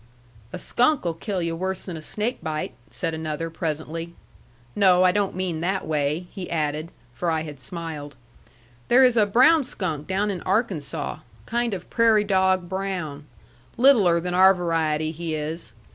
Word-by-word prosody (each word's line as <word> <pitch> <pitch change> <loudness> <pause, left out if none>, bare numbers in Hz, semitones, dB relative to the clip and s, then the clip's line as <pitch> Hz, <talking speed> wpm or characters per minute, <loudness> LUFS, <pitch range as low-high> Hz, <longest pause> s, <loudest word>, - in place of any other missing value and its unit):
"A - - -5
skunk'll 240 - +1
kill 180 +2 -3
yu' 165 0 -2
worse 190 +2 -3
than 180 - -5
a 160 - -7
snake 215 +9 -3
bite," 155 -2 -3 0.2
said 165 - -3
another, 160 +1 -4
presently. 165 +1 -4 0.6
"No, 185 -2 +5
I 185 - +5
don't 200 0 0
mean 180 -4 -2
that 190 +2 -1
way," 150 +2 -1
he 185 -2 -7
added. 155 0 -2 0.2
For 170 +8 -2
I 160 -1 +1
had 150 -3 -8
smiled. 150 0 -6 0.7
"There 255 +2 +6
is 250 -2 +5
a 215 -3 +4
brown 270 +9 +5
skunk 165 - -4
down 200 +2 0
in 185 - -5
Arkansaw. 165 - -2 0.3
Kind 235 -2 -1
of 180 - -9
prairie 225 -2 +4
dog 190 -2 +2
brown. 180 -6 -4 0.5
Littler 225 -10 +5
than 180 +1 -3
our 190 +1 +6
variety, 160 -3 0
he 165 0 -4
is. 155 -4 -5
175 Hz, 160 wpm, -24 LUFS, 160-195 Hz, 0.7 s, There